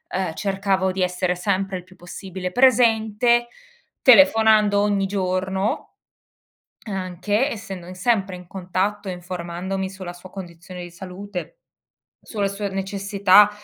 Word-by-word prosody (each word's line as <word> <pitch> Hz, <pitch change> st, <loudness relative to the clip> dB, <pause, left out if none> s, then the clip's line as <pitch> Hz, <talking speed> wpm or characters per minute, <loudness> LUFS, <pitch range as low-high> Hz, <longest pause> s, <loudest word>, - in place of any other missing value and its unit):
uhm, 185 Hz, -3 st, -1 dB
cercavo 195 Hz, 0 st, 0 dB
di 185 Hz, 0 st, -3 dB
essere 180 Hz, 0 st, 0 dB
sempre 195 Hz, +1 st, -1 dB
il 180 Hz, -, -9 dB
più 185 Hz, +1 st, -19 dB
possibile 180 Hz, +1 st, -6 dB
presente, 235 Hz, -1 st, +4 dB, 0.5 s
telefonando 220 Hz, -7 st, +6 dB
ogni 205 Hz, -1 st, +2 dB
giorno, 190 Hz, 0 st, -2 dB, 0.9 s
anche, 205 Hz, -, -1 dB
essendo 195 Hz, -5 st, -7 dB
sempre 195 Hz, -2 st, +1 dB
in 180 Hz, -1 st, -12 dB
contatto, 190 Hz, +2 st, -2 dB
informandomi 180 Hz, +1 st, -4 dB
sulla 185 Hz, -2 st, -8 dB
sua 175 Hz, +1 st, -13 dB
condizione 180 Hz, -1 st, -9 dB
di 175 Hz, -, -9 dB
salute, 190 Hz, -, -7 dB, 0.7 s
sulla 205 Hz, -3 st, -2 dB
sua 200 Hz, +1 st, -3 dB
necessità, 195 Hz, +1 st, +4 dB
195 Hz, 115 wpm, -22 LUFS, 185-205 Hz, 0.9 s, telefonando